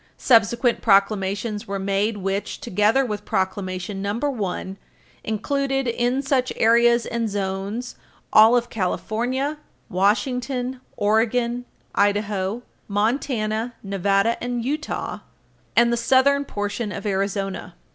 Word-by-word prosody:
Subsequent 235 Hz, 0 st, +3 dB
proclamations 200 Hz, +1 st, +1 dB
were 200 Hz, 0 st, -2 dB
made 200 Hz, +3 st, 0 dB
which, 195 Hz, +1 st, -3 dB
together 210 Hz, +8 st, +2 dB
with 210 Hz, -3 st, -4 dB
Proclamation 190 Hz, 0 st, -2 dB
No. 200 Hz, +1 st, -1 dB
1, 210 Hz, -7 st, -3 dB, 0.5 s
included 270 Hz, +4 st, -1 dB
in 245 Hz, +3 st, 0 dB
such 265 Hz, -2 st, +1 dB
areas 235 Hz, +1 st, +4 dB
and 230 Hz, -2 st, -2 dB
zones 200 Hz, +4 st, -3 dB, 0.4 s
all 220 Hz, +3 st, +8 dB
of 240 Hz, 0 st, -2 dB
California, 245 Hz, +8 st, -2 dB, 0.3 s
Washington, 250 Hz, +6 st, 0 dB, 0.2 s
Oregon, 235 Hz, +3 st, +1 dB, 0.3 s
Idaho, 205 Hz, +1 st, 0 dB, 0.2 s
Montana, 220 Hz, +1 st, -1 dB
Nevada 195 Hz, +3 st, +1 dB
and 245 Hz, -1 st, -2 dB
Utah, 300 Hz, +3 st, -3 dB, 0.6 s
and 235 Hz, 0 st, +5 dB
the -, -, +1 dB
southern 275 Hz, +4 st, +3 dB
portion 205 Hz, -1 st, -3 dB
of 190 Hz, -, -6 dB
Arizona. 195 Hz, -2 st, -2 dB
220 Hz, 105 wpm, -23 LUFS, 200-245 Hz, 0.6 s, all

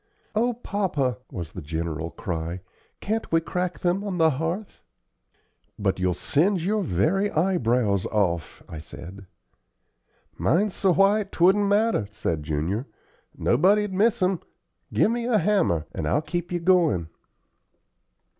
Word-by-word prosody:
"O 240 Hz, +3 st, +1 dB
papa!" 190 Hz, -, -1 dB
was 85 Hz, -3 st, -6 dB
the 90 Hz, -, -7 dB
general 80 Hz, +1 st, -3 dB
cry, 85 Hz, 0 st, -4 dB, 0.4 s
"can't 220 Hz, +2 st, -2 dB
we 165 Hz, -, +4 dB
crack 180 Hz, +2 st, -3 dB
them 180 Hz, +3 st, +1 dB
on 200 Hz, -3 st, -3 dB
the 160 Hz, -1 st, +4 dB
hearth?" 165 Hz, +9 st, -4 dB, 1.0 s
"But 95 Hz, -2 st, 0 dB
you'll 90 Hz, -1 st, +1 dB
singe 170 Hz, -, +1 dB
your 210 Hz, +2 st, +1 dB
very 185 Hz, -, +1 dB
eyebrows 125 Hz, -, +1 dB
off," 90 Hz, -6 st, -1 dB
I 80 Hz, -, -7 dB
said. 90 Hz, +5 st, -10 dB, 1.1 s
"Mine's 200 Hz, +3 st, +2 dB
so 190 Hz, -, +2 dB
white 195 Hz, +2 st, +3 dB
'twouldn't 195 Hz, +4 st, +4 dB
matter," 205 Hz, -, +2 dB
said 85 Hz, -6 st, -2 dB
Junior; 80 Hz, -, -2 dB, 0.5 s
"nobody'd 195 Hz, -, +3 dB
miss 215 Hz, +2 st, +2 dB
'em. 185 Hz, -1 st, +1 dB, 0.5 s
Give 220 Hz, -, +3 dB
me 235 Hz, 0 st, -2 dB
a 235 Hz, -3 st, +3 dB
hammer, 190 Hz, -, +2 dB
and 75 Hz, -, -3 dB
I'll 150 Hz, -, +1 dB
keep 175 Hz, +1 st, -4 dB
you 175 Hz, -, 0 dB
goin'." 165 Hz, -, +3 dB
165 Hz, 135 wpm, -25 LUFS, -, 1.1 s, we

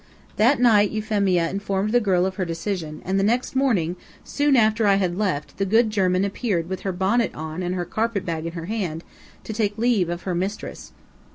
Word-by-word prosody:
That 245 Hz, +6 st, +4 dB
night 215 Hz, -4 st, +5 dB
Euphemia 200 Hz, -5 st, +1 dB
informed 200 Hz, +1 st, -1 dB
the 245 Hz, -, +4 dB
girl 185 Hz, -5 st, +2 dB
of 190 Hz, -, -2 dB
her 190 Hz, -, 0 dB
decision, 165 Hz, -2 st, -4 dB
and 190 Hz, +1 st, 0 dB
the -, -, +1 dB
next 240 Hz, +5 st, 0 dB
morning, 195 Hz, -11 st, +1 dB, 0.3 s
soon 290 Hz, -1 st, +1 dB
after 220 Hz, -2 st, +3 dB
I 200 Hz, -, +5 dB
had 185 Hz, -3 st, 0 dB
left, 185 Hz, -7 st, -2 dB
the 195 Hz, -, 0 dB
good 220 Hz, +3 st, +3 dB
German 185 Hz, -2 st, +2 dB
appeared 195 Hz, -4 st, -1 dB
with 190 Hz, +1 st, -4 dB
her 195 Hz, -, -3 dB
bonnet 195 Hz, +6 st, 0 dB
on 160 Hz, +3 st, -5 dB
and 180 Hz, 0 st, -2 dB
her 175 Hz, -1 st, -2 dB
carpet 220 Hz, +1 st, -2 dB
bag 165 Hz, -1 st, -3 dB
in 165 Hz, -, -6 dB
her 165 Hz, -1 st, -6 dB
hand, 180 Hz, -6 st, -3 dB, 0.4 s
to 220 Hz, -, -6 dB
take 210 Hz, -1 st, -1 dB
leave 220 Hz, -6 st, +2 dB
of 175 Hz, 0 st, -4 dB
her 185 Hz, -, -2 dB
mistress. 190 Hz, +4 st, -4 dB
195 Hz, 205 wpm, -23 LUFS, 175-220 Hz, 0.4 s, night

